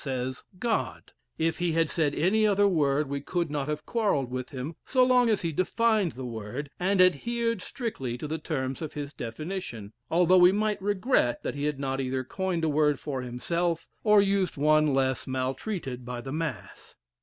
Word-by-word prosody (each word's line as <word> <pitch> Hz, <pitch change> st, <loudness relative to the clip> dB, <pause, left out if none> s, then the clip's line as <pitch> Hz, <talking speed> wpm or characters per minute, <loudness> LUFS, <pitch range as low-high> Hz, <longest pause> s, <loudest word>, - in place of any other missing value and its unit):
says, 130 Hz, -2 st, -3 dB
"God." 230 Hz, +3 st, -2 dB, 0.2 s
If 165 Hz, +1 st, 0 dB
he 175 Hz, -2 st, +1 dB
had 165 Hz, 0 st, +2 dB
said 150 Hz, -3 st, 0 dB
any 215 Hz, +5 st, +3 dB
other 205 Hz, 0 st, +4 dB
word 150 Hz, -5 st, +2 dB
we 140 Hz, 0 st, -3 dB
could 170 Hz, +1 st, -2 dB
not 145 Hz, -2 st, -2 dB
have 150 Hz, 0 st, -3 dB
quarrelled 200 Hz, -, 0 dB
with 130 Hz, 0 st, -4 dB
him 140 Hz, +3 st, -6 dB
so 255 Hz, -1 st, +3 dB
long 250 Hz, -2 st, +4 dB
as 215 Hz, -4 st, +1 dB
he 165 Hz, -, 0 dB
defined 210 Hz, +3 st, +1 dB
the 130 Hz, 0 st, -7 dB
word, 120 Hz, +5 st, -6 dB
and 190 Hz, +2 st, +1 dB
adhered 230 Hz, -, +2 dB
strictly 135 Hz, -, -4 dB
to 150 Hz, -, -5 dB
the 160 Hz, +2 st, -3 dB
terms 135 Hz, -4 st, -3 dB
of 155 Hz, -, -5 dB
his 145 Hz, -1 st, -5 dB
definition, 115 Hz, -, -6 dB, 0.2 s
although 180 Hz, +2 st, +5 dB
we 180 Hz, +1 st, +8 dB
might 210 Hz, +1 st, 0 dB
regret 205 Hz, -, +1 dB
that -, -, -2 dB
he 145 Hz, 0 st, -3 dB
had 150 Hz, -2 st, -1 dB
not 135 Hz, -1 st, -1 dB
either 130 Hz, 0 st, -2 dB
coined 180 Hz, +4 st, -2 dB
a -, -, +3 dB
word 150 Hz, -1 st, +2 dB
for 135 Hz, -4 st, -4 dB
himself, 165 Hz, +7 st, -2 dB, 0.2 s
or 210 Hz, -2 st, +6 dB
used 195 Hz, -5 st, 0 dB
one 155 Hz, +1 st, +4 dB
less 130 Hz, -1 st, 0 dB
maltreated 130 Hz, -, -3 dB
by 125 Hz, 0 st, -5 dB
the 135 Hz, +2 st, -7 dB
mass. 160 Hz, 0 st, -5 dB
155 Hz, 190 wpm, -28 LUFS, 135-190 Hz, 0.2 s, we